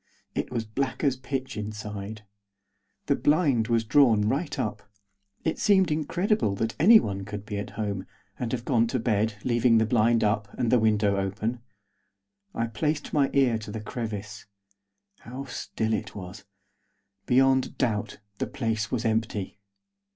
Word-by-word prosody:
It -, -, -2 dB
was 115 Hz, -2 st, -2 dB
black 130 Hz, +7 st, -3 dB
as 140 Hz, -3 st, +3 dB
pitch 130 Hz, 0 st, -4 dB
inside. 105 Hz, 0 st, -6 dB, 0.8 s
The 140 Hz, -, +2 dB
blind 145 Hz, -8 st, +2 dB
was 115 Hz, -1 st, +2 dB
drawn 115 Hz, -2 st, +4 dB
right 145 Hz, +7 st, -1 dB
up; 110 Hz, -5 st, -2 dB, 0.6 s
it 160 Hz, -, -1 dB
seemed 190 Hz, -5 st, +4 dB
incredible 165 Hz, -, 0 dB
that 115 Hz, +3 st, -1 dB
anyone 150 Hz, -, +5 dB
could 105 Hz, +1 st, -7 dB
be 105 Hz, -2 st, -4 dB
at 100 Hz, -, -5 dB
home, 100 Hz, -3 st, -3 dB, 0.3 s
and 120 Hz, -2 st, -2 dB
have 120 Hz, -1 st, -3 dB
gone 115 Hz, -3 st, +3 dB
to 130 Hz, -, -1 dB
bed, 110 Hz, -1 st, +1 dB
leaving 120 Hz, -1 st, +3 dB
the 110 Hz, -, +3 dB
blind 115 Hz, 0 st, +3 dB
up, 105 Hz, -1 st, 0 dB
and 115 Hz, -, 0 dB
the 125 Hz, -, +5 dB
window 105 Hz, -2 st, +2 dB
open. 105 Hz, +5 st, -2 dB, 1.0 s
I 115 Hz, -, 0 dB
placed 150 Hz, +7 st, -2 dB
my 140 Hz, -2 st, +3 dB
ear 130 Hz, -5 st, +3 dB
to 110 Hz, -, -9 dB
the 110 Hz, +2 st, -5 dB
crevice. 110 Hz, -2 st, -6 dB, 0.7 s
How 130 Hz, +3 st, -7 dB
still 110 Hz, -3 st, -3 dB
it 105 Hz, -, -3 dB
was! 100 Hz, +1 st, -9 dB, 0.8 s
Beyond 130 Hz, +1 st, +3 dB
doubt, 110 Hz, -5 st, -1 dB, 0.2 s
the -, -, -1 dB
place 110 Hz, -4 st, -2 dB
was 120 Hz, -2 st, -2 dB
empty. 110 Hz, -3 st, -1 dB
115 Hz, 150 wpm, -27 LUFS, 105-130 Hz, 1.0 s, anyone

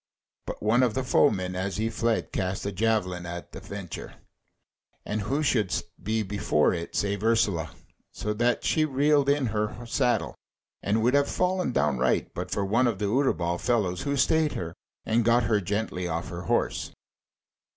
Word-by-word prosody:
But -, -, -6 dB
one 115 Hz, +4 st, +4 dB
of 120 Hz, -4 st, +2 dB
the 130 Hz, -, 0 dB
foemen 95 Hz, -8 st, +2 dB
as 95 Hz, +2 st, -2 dB
he 110 Hz, +1 st, 0 dB
fled 115 Hz, 0 st, 0 dB
cast 95 Hz, 0 st, -2 dB
a 100 Hz, -, -1 dB
javelin 90 Hz, -4 st, 0 dB
at 85 Hz, 0 st, -7 dB
a -, -, -5 dB
venture, -, -, -7 dB, 0.9 s
and 105 Hz, +1 st, -2 dB
who 140 Hz, +9 st, -1 dB
should 110 Hz, -10 st, +1 dB, 0.3 s
be 110 Hz, +3 st, 0 dB
before 100 Hz, -6 st, +1 dB
it 85 Hz, -1 st, -5 dB
save 100 Hz, 0 st, -1 dB
Ursula, 100 Hz, -8 st, +2 dB, 0.4 s
so 105 Hz, -, -3 dB
that 120 Hz, +3 st, +1 dB
she 155 Hz, -, +2 dB
reeled 145 Hz, 0 st, +3 dB
in 140 Hz, -1 st, +2 dB
her 105 Hz, +3 st, -2 dB
saddle, 120 Hz, +1 st, +1 dB, 0.5 s
and 110 Hz, +2 st, +1 dB
would 125 Hz, +3 st, +3 dB
have 145 Hz, 0 st, +3 dB
fallen 180 Hz, -4 st, 0 dB
downright 65 Hz, -, +1 dB
but -, -, -5 dB
for 100 Hz, -, -1 dB
one 115 Hz, +6 st, +3 dB
of 115 Hz, -5 st, 0 dB
the 105 Hz, -, -2 dB
Utterbol 90 Hz, -10 st, +1 dB
fellows 105 Hz, -7 st, +1 dB
who 140 Hz, 0 st, -1 dB
stayed 160 Hz, +2 st, +3 dB
her, 85 Hz, -1 st, -4 dB, 0.3 s
and 115 Hz, +1 st, +2 dB
got 120 Hz, +2 st, +4 dB
her 110 Hz, -2 st, +2 dB
gently 100 Hz, -2 st, -2 dB
off 85 Hz, 0 st, -3 dB
her 85 Hz, 0 st, -6 dB
horse. -, -, 0 dB
110 Hz, 170 wpm, -27 LUFS, 95-125 Hz, 0.9 s, one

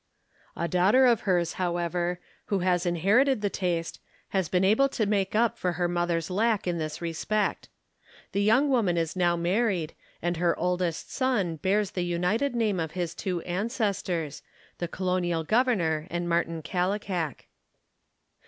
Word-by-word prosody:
A 170 Hz, -, -2 dB
daughter 190 Hz, +10 st, +4 dB
of 235 Hz, -4 st, +4 dB
hers, 175 Hz, -2 st, +2 dB
however, 175 Hz, 0 st, -1 dB, 0.3 s
who 200 Hz, -, 0 dB
has 180 Hz, -1 st, +2 dB
inherited 210 Hz, -, +3 dB
the 205 Hz, -2 st, 0 dB
taste, 170 Hz, -3 st, -2 dB, 0.3 s
has 190 Hz, -4 st, 0 dB
been 180 Hz, 0 st, +2 dB
able 220 Hz, +8 st, +4 dB
to 225 Hz, -5 st, -1 dB
make 200 Hz, -1 st, 0 dB
up 230 Hz, 0 st, +2 dB
for 180 Hz, -1 st, 0 dB
her 175 Hz, 0 st, 0 dB
mother's 175 Hz, -1 st, -1 dB
lack 215 Hz, +2 st, +1 dB
in 175 Hz, -2 st, -1 dB
this 155 Hz, +1 st, -4 dB
respect. 200 Hz, +6 st, -1 dB, 0.6 s
The 200 Hz, -, 0 dB
young 225 Hz, +8 st, +4 dB
woman 225 Hz, -11 st, +2 dB
is 165 Hz, 0 st, -1 dB
now 175 Hz, -2 st, +2 dB
married, 175 Hz, -1 st, 0 dB, 0.3 s
and 175 Hz, 0 st, -1 dB
her 170 Hz, 0 st, +1 dB
oldest 180 Hz, -2 st, -1 dB
son 215 Hz, -, 0 dB
bears 195 Hz, +5 st, +1 dB
the 180 Hz, -, -2 dB
united 180 Hz, +10 st, 0 dB
name 215 Hz, -5 st, +1 dB
of 160 Hz, -2 st, -3 dB
his 175 Hz, -2 st, -3 dB
two 180 Hz, -3 st, -3 dB
ancestors, 195 Hz, -, -2 dB, 0.4 s
the 175 Hz, -, -2 dB
colonial 175 Hz, -2 st, -1 dB
governor 180 Hz, -8 st, +1 dB
and 175 Hz, -1 st, -2 dB
Martin 165 Hz, -1 st, 0 dB
Kallikak. 180 Hz, -3 st, -2 dB
180 Hz, 155 wpm, -27 LUFS, 170-210 Hz, 0.6 s, daughter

